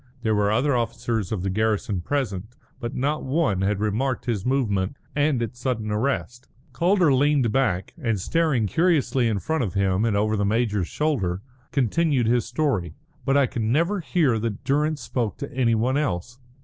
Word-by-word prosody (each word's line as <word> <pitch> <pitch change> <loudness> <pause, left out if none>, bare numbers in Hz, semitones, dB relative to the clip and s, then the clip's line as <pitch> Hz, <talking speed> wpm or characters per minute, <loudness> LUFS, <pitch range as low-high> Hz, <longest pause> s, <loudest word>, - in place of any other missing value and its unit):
There 110 -2 +2
were 105 -1 +2
other 125 +5 +2
officers 115 -3 -2
of 100 -5 -2
the 95 - -1
garrison 105 -2 0
present, 110 -3 -3 0.2
but 120 -1 -5
not 145 +4 -1
one 130 - +1
had 100 +1 0
remarked 115 +5 -1
his 115 -3 -2
movement 110 -6 0 0.2
and 145 -4 +2
its 120 +1 -6
sudden 115 -4 -2
arrest. 120 +2 -2 0.3
Calder 175 -3 +3
leaned 140 -3 +3
back, 105 -9 0
and 115 -6 0
staring 155 - +1
curiously 145 - +2
in 110 -3 0
front 160 +7 -1
of 100 -4 -4
him 95 0 +1
and 110 -3 +1
over 110 +1 +1
the 100 - 0
major's 105 -3 +1
shoulder, 105 - -1 0.3
continued 140 0 +1
his 120 +1 +2
story. 105 - -1 0.3
"But 135 +1 +3
I 140 - +5
could 120 - -4
never 165 - +1
hear 155 -9 +1
that 110 -2 -3
Durrance 150 +2 0
spoke 115 -5 -2
to 140 +1 -6
any 120 -3 +2
one 125 +5 +1
else. 120 - -2
120 Hz, 175 wpm, -24 LUFS, 105-140 Hz, 0.3 s, I